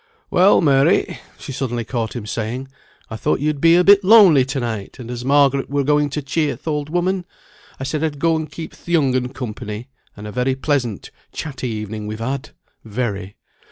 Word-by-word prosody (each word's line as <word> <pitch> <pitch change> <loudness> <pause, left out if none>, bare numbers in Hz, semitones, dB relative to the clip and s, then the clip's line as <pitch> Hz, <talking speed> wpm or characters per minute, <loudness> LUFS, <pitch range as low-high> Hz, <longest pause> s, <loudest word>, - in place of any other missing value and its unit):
"Well, 185 +3 +5
Mary," 140 -4 +3 0.2
she - - -8
suddenly 125 -3 -3
caught 115 -2 -3
him 115 -4 -5
saying, 120 +5 -4 0.4
"I - - -4
thought 110 - 0
you'd 145 0 -1
be 165 0 +6
a 180 - +5
bit 200 +1 +6
lonely 190 - +7
to 135 +1 -3
night; 110 -5 -4
and 125 -1 -8
as 120 0 -5
Margaret 140 0 +3
were 140 0 0
going 150 +1 +2
to 145 +1 -4
cheer 145 -1 -1
th' 150 - -18
old 150 -1 -2
woman, 180 +2 0 0.6
I - - -4
said 150 +3 -2
I'd 155 -2 -1
go 165 +2 +2
and 155 -1 -3
keep 165 - -7
th' - - -22
young 150 -7 +2
un 125 -1 0
company; 115 -2 -6 0.3
and 105 - -9
a 105 - -6
very 125 +3 0
pleasant, 135 -6 -2 0.2
chatty 135 -4 -5
evening 105 -1 -5
we've 110 +1 -5
had; 130 +5 -4 0.3
very. 105 -4 -4
135 Hz, 195 wpm, -20 LUFS, 120-150 Hz, 0.6 s, lonely